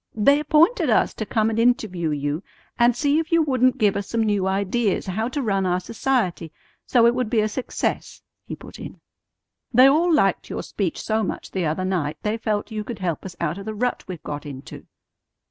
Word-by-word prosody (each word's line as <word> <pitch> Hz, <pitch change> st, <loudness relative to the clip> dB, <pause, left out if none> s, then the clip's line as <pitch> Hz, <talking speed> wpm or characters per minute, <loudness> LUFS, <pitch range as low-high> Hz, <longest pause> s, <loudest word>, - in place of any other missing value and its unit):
"They 280 Hz, +7 st, +4 dB
appointed 315 Hz, -, +3 dB
us -, -, +3 dB
to 220 Hz, -, -5 dB
come 220 Hz, -1 st, +1 dB
and 225 Hz, -, -1 dB
interview 215 Hz, -8 st, +1 dB
you, 145 Hz, +2 st, -2 dB, 0.4 s
and 240 Hz, 0 st, +4 dB
see 290 Hz, +3 st, +2 dB
if 325 Hz, 0 st, -4 dB
you 335 Hz, -1 st, +4 dB
wouldn't 255 Hz, -3 st, +2 dB
give 205 Hz, -2 st, +2 dB
us 200 Hz, -, -3 dB
some 230 Hz, -1 st, 0 dB
new 205 Hz, -3 st, +1 dB
ideas 200 Hz, +2 st, 0 dB
how 215 Hz, +5 st, -2 dB
to 275 Hz, +2 st, -3 dB
run 195 Hz, -4 st, 0 dB
our 180 Hz, 0 st, +1 dB
society 185 Hz, -, -1 dB, 0.4 s
so 240 Hz, -2 st, +4 dB
it 235 Hz, -, +5 dB
would 250 Hz, -3 st, -1 dB
be 230 Hz, -, +2 dB
a 215 Hz, -, +1 dB
success," 245 Hz, +4 st, -3 dB, 0.2 s
he -, -, -7 dB
put -, -, -13 dB
in. -, -, -9 dB, 0.7 s
"They 250 Hz, +2 st, +7 dB
all 315 Hz, +6 st, +4 dB
liked 195 Hz, -, +2 dB
your -, -, -4 dB
speech 190 Hz, -5 st, -3 dB
so 220 Hz, 0 st, 0 dB
much 205 Hz, -, -4 dB
the 185 Hz, -4 st, -1 dB
other 165 Hz, +5 st, -1 dB
night 170 Hz, -6 st, -1 dB
they 210 Hz, +1 st, 0 dB
felt 215 Hz, -2 st, -2 dB
you 215 Hz, -1 st, -3 dB
could 230 Hz, +1 st, -6 dB
help 175 Hz, -5 st, -3 dB
us 185 Hz, -2 st, -8 dB
out 170 Hz, +2 st, -2 dB
of 195 Hz, -, -8 dB
the 220 Hz, 0 st, -5 dB
rut 245 Hz, +3 st, -1 dB
we've 180 Hz, -4 st, -7 dB
got 145 Hz, -1 st, -5 dB
into." 140 Hz, -2 st, -10 dB
215 Hz, 215 wpm, -23 LUFS, 185-245 Hz, 0.7 s, They